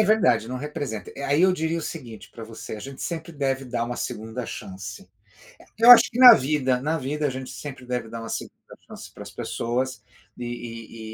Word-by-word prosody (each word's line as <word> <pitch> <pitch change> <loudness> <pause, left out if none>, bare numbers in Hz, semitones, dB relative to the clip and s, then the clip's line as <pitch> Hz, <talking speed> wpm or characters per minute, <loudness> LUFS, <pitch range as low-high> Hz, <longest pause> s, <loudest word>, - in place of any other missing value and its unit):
É 215 - +5
verdade, 125 - +3
não 130 - -4
representa. 135 -6 -5
Aí 145 +5 +2
eu 185 0 +5
diria 160 -1 -1
o - - -5
seguinte 120 -11 -8
pra 115 - -9
você: 110 -1 -8
A - - -9
gente 135 +4 -8
sempre 170 0 -5
deve 135 -2 -1
dar 120 -2 -2
uma 120 +1 -4
2ª 110 +1 -5
chance. 95 0 -8 0.7
Eu 235 +2 +8
acho 245 - +10
que 240 - -6
na 255 -1 +11
vida. 130 -2 +1
Na 155 +4 0
vida 145 +2 -2
a - - -1
gente 130 0 -6
sempre 135 -3 -8
deve 125 -2 -3
dar 115 +1 -7
uma 115 - -7
2ª - - -5 0.3
chance - - -11
para - - -10
as - - -9
pessoas, 120 -1 -3 0.4
e 115 -2 -7
130 Hz, 205 wpm, -24 LUFS, 115-150 Hz, 0.7 s, na